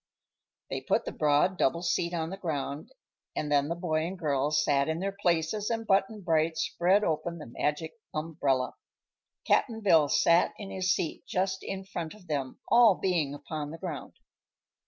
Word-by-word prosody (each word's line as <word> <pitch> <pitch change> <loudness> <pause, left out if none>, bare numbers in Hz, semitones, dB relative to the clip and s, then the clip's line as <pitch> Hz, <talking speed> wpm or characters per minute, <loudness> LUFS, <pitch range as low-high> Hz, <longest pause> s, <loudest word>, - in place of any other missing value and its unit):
They - - -2
put - - 0
the - - -3
broad 150 +5 +2
double 170 +6 +2
seat 170 0 0
on 165 -1 -2
the 195 - -5
ground 150 -5 -4 0.4
and 150 -1 -2
then 145 -1 +3
the 170 - -2
boy 160 -2 -1
and 190 +2 -6
girl 145 -4 0
sat 145 -1 +2
in 160 - 0
their 195 +2 -1
places 175 +5 +1
and 225 -1 -2
Button 200 +1 +1
Bright 160 -2 +1
spread 185 +4 +2
open 170 0 -1
the 155 - -8
Magic 150 +6 -2 0.2
Umbrella. 145 -5 -1 0.7
Cap'n 225 -3 +2
Bill 165 -8 +5
sat 170 +4 +4
in 200 -2 -7
his 185 0 0
seat 165 - -2
just 190 +1 0
in 195 0 -5
front 170 -2 -5
of 210 -4 -17
them, 140 -5 -3
all 235 -4 +6
being 165 -8 0
upon 145 +1 -5
the 165 - -7
ground. 165 -6 -6
165 Hz, 175 wpm, -29 LUFS, 150-190 Hz, 0.7 s, all